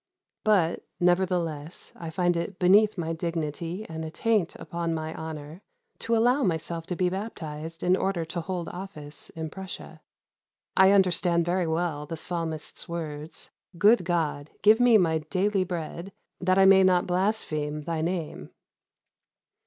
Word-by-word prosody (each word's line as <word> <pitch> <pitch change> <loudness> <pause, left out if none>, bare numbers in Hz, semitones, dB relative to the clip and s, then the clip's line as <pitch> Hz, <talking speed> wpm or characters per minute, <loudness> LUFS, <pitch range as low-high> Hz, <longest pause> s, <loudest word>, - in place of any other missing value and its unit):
But, 190 -6 +2 0.2
nevertheless, 175 -4 0
I 165 - -7
find 175 +1 +1
it 170 +3 -3
beneath 205 +4 +5
my 165 -1 -2
dignity 165 +3 -3
and 160 0 -6
a 160 - -4
taint 210 0 0
upon 170 -1 -3
my 160 0 -4
honor, 160 +1 -7 0.4
to 230 0 0
allow 245 +5 +3
myself 165 - -1
to 180 - -2
be 180 +1 +1
baptized 165 -5 -5
in 180 +1 +4
order 190 -4 -1
to 170 +2 -4
hold 175 0 -4
office 175 -6 -3
in 160 -2 -6
Prussia. 190 0 -8 0.7
I 190 0 +7
understand 180 -3 +3
very 175 0 0
well 160 -2 -1
the 165 - -5
Psalmist's 165 0 -3
words: 155 -2 -6 0.3
'Good 210 +4 +5
God, 160 -4 -1
give 215 +3 +6
me 245 -2 +6
my 165 -5 +2
daily 190 +5 0
bread, 175 +1 -5 0.3
that 185 +1 +2
I 195 - +6
may 190 0 +7
not 180 -1 +4
blaspheme 160 -6 -1
thy 165 0 -2
name!'" 170 -1 -3
175 Hz, 145 wpm, -27 LUFS, 160-190 Hz, 0.7 s, I